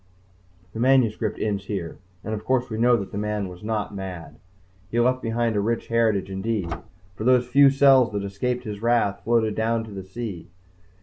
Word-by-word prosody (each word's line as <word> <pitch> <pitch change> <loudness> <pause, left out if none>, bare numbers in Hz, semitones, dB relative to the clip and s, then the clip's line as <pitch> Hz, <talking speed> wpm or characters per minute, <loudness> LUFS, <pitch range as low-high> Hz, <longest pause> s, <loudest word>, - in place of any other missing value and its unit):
_The 110 - -6
manuscript 120 -4 +2
ends 100 -2 -2
here 95 -5 -5 0.2
and 110 - -4
of 105 0 -4
course 130 -2 0
we 110 - -3
know 120 +1 +5
that 100 -3 -6
the 100 - -4
"man" 105 -1 -2
was 90 +1 -11
not 105 -1 -2
mad. 90 -6 -7 0.5
He 115 - -1
left 130 +2 +2
behind 115 -1 -1
a 100 - +2
rich 115 +3 -2
heritage 110 -5 +1
indeed, 95 -3 -2 0.4
for 105 - -6
those 125 0 +4
few 140 +2 +6
cells 135 -3 +5
that 100 -1 -2
escaped 125 +6 -2
his 105 -2 -6
wrath 115 -4 +2
and - - -28
floated 115 -2 +2
down 115 +1 0
to 110 - -10
the 100 -1 -6
sea. 100 -2 -7
110 Hz, 195 wpm, -24 LUFS, 100-120 Hz, 0.5 s, few